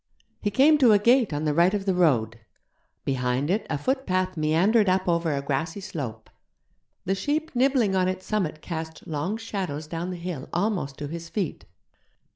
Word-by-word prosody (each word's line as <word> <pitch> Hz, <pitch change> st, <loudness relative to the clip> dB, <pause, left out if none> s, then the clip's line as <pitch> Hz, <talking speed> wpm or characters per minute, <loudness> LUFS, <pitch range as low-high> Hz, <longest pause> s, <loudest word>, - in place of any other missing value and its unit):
He 205 Hz, -, 0 dB
came 285 Hz, +8 st, +5 dB
to 245 Hz, -6 st, +6 dB
a -, -, +7 dB
gate 235 Hz, +1 st, +4 dB
on 145 Hz, +1 st, -2 dB
the 150 Hz, -, +1 dB
right 175 Hz, +5 st, +4 dB
of 195 Hz, -1 st, -3 dB
the 190 Hz, -, +2 dB
road. 120 Hz, -, +2 dB, 0.7 s
Behind 130 Hz, +3 st, 0 dB
it 205 Hz, +2 st, -1 dB
a 155 Hz, -, 0 dB
footpath 185 Hz, -, -1 dB
meandered 180 Hz, +7 st, +3 dB
up 185 Hz, 0 st, +1 dB
over 170 Hz, -2 st, +1 dB
a 140 Hz, -, -3 dB
grassy 150 Hz, +7 st, -2 dB
slope. 135 Hz, -, -6 dB, 0.8 s
The 190 Hz, -, +1 dB
sheep 295 Hz, +9 st, -2 dB
nibbling 250 Hz, -6 st, +3 dB
on 185 Hz, -1 st, +2 dB
its 185 Hz, 0 st, -3 dB
summit 180 Hz, -8 st, -2 dB
cast 160 Hz, -2 st, -6 dB
long 170 Hz, +6 st, -2 dB
shadows 190 Hz, -9 st, -4 dB
down 165 Hz, +3 st, -4 dB
the 180 Hz, -, -5 dB
hill 170 Hz, -6 st, -6 dB
almost 175 Hz, -7 st, -1 dB
to 145 Hz, -, -5 dB
his 165 Hz, +2 st, -7 dB
feet. 190 Hz, -7 st, -3 dB
180 Hz, 180 wpm, -25 LUFS, 155-205 Hz, 0.8 s, a